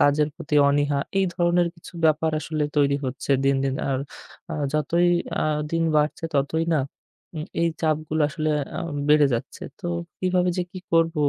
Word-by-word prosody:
কাজের 145 Hz, +1 st, +4 dB
প্রতি 150 Hz, -3 st, -1 dB
অনীহা। 145 Hz, 0 st, +2 dB, 0.2 s
এই 195 Hz, -, +3 dB
ধরনের 175 Hz, 0 st, +2 dB
কিছু 170 Hz, -, -13 dB
ব্যাপার 160 Hz, 0 st, +3 dB
আসলে 155 Hz, 0 st, -2 dB
তৈরি 140 Hz, -1 st, +3 dB
হচ্ছে 130 Hz, +2 st, -2 dB
দিন, 135 Hz, 0 st, +3 dB
দিন। 135 Hz, -1 st, 0 dB, 0.2 s
আর 130 Hz, -, +1 dB, 0.5 s
আ -, -, -2 dB, 0.2 s
যতই 165 Hz, +4 st, +2 dB, 0.3 s
আ -, -, +2 dB, 0.3 s
দিন 165 Hz, 0 st, +1 dB
বাড়ছে 150 Hz, +2 st, +1 dB
ততই 150 Hz, +4 st, +1 dB
না 150 Hz, -, +3 dB, 0.6 s
উম 155 Hz, -, -3 dB, 0.2 s
এই 170 Hz, -, +3 dB
চাপগুলো 155 Hz, 0 st, 0 dB
আসলে 155 Hz, 0 st, -1 dB, 0.3 s
আ -, -, -2 dB, 0.3 s
বেড়ে 150 Hz, -1 st, +6 dB
যাচ্ছে। 115 Hz, -, -5 dB, 0.2 s
তো -, -, -5 dB, 0.3 s
কিভাবে 180 Hz, -1 st, +1 dB
যে -, -, +2 dB
কি 185 Hz, -, -6 dB
করব? 165 Hz, 0 st, +3 dB
155 Hz, 170 wpm, -24 LUFS, 145-165 Hz, 0.6 s, বেড়ে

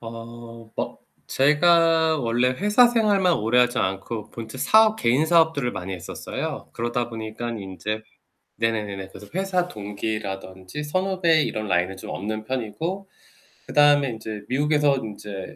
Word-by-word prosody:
어. 115 Hz, 0 st, -10 dB
어 -, -, -3 dB, 0.3 s
제가 160 Hz, +2 st, +4 dB
원래 120 Hz, 0 st, +1 dB
회사 210 Hz, -, +4 dB
생활만 205 Hz, -6 st, +3 dB
오래하지 120 Hz, +3 st, +2 dB
않고 95 Hz, +3 st, -3 dB
본체 115 Hz, +2 st, -8 dB
사업, 220 Hz, +9 st, +5 dB
개인사업들을 155 Hz, -, +3 dB
많이 95 Hz, +1 st, -5 dB
했었어요. 90 Hz, -, -6 dB
그러다 120 Hz, +1 st, -2 dB
보니깐 115 Hz, +1 st, -5 dB
인제 105 Hz, +3 st, -5 dB, 0.6 s
네네네네 105 Hz, -4 st, -2 dB
그래서 105 Hz, -, -12 dB
회사 185 Hz, -2 st, 0 dB
동기라든지 100 Hz, -, -5 dB
선후배 175 Hz, -1 st, +2 dB
이런 110 Hz, 0 st, -3 dB
라인은 90 Hz, +1 st, 0 dB
좀 -, -, -9 dB
없는 110 Hz, +3 st, -4 dB
편이고 160 Hz, -, -3 dB, 0.6 s
그 -, -, -9 dB
다음에 145 Hz, -2 st, +5 dB
인제 110 Hz, -2 st, -6 dB
미국에서 145 Hz, +1 st, +2 dB
인제 105 Hz, -4 st, -7 dB
120 Hz, 315 characters per minute, -24 LUFS, 110-160 Hz, 0.6 s, 사업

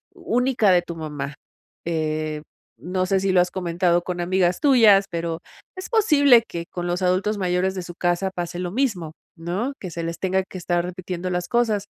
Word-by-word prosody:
única 245 Hz, -4 st, +1 dB
de 180 Hz, -1 st, +5 dB
tu 170 Hz, -1 st, -8 dB
mamá. 150 Hz, -3 st, -5 dB, 0.5 s
Eh, 155 Hz, -2 st, -2 dB, 0.4 s
no 180 Hz, +8 st, -2 dB
sé 195 Hz, 0 st, +1 dB
si 190 Hz, 0 st, +1 dB
lo 185 Hz, -, +4 dB
has 180 Hz, -, -1 dB
comentado 175 Hz, -1 st, +1 dB
con 180 Hz, -1 st, -4 dB
amigas 180 Hz, 0 st, +1 dB
tuyas, 220 Hz, -8 st, +6 dB
pero 165 Hz, -1 st, -3 dB, 0.4 s
es 370 Hz, 0 st, -7 dB
posible 285 Hz, -, +5 dB
que 170 Hz, 0 st, -5 dB
con 175 Hz, -1 st, -4 dB
los 175 Hz, +2 st, -1 dB
adultos 190 Hz, +4 st, +1 dB
mayores 185 Hz, 0 st, 0 dB
de 185 Hz, -, -4 dB
su 175 Hz, 0 st, -8 dB
casa 175 Hz, +2 st, 0 dB
pase 175 Hz, 0 st, -4 dB
lo 180 Hz, -1 st, -3 dB
mismo, 195 Hz, -, -1 dB, 0.2 s
¿no?, 185 Hz, +11 st, -3 dB
que 185 Hz, -, -6 dB
se 170 Hz, +1 st, -5 dB
les 165 Hz, 0 st, -4 dB
tenga 190 Hz, +1 st, +1 dB
que 190 Hz, -, -10 dB
estar 175 Hz, 0 st, 0 dB
repitiendo 180 Hz, 0 st, -5 dB
las 180 Hz, 0 st, -2 dB
cosas. 220 Hz, -3 st, +1 dB
180 Hz, 190 wpm, -23 LUFS, 170-195 Hz, 0.5 s, tuyas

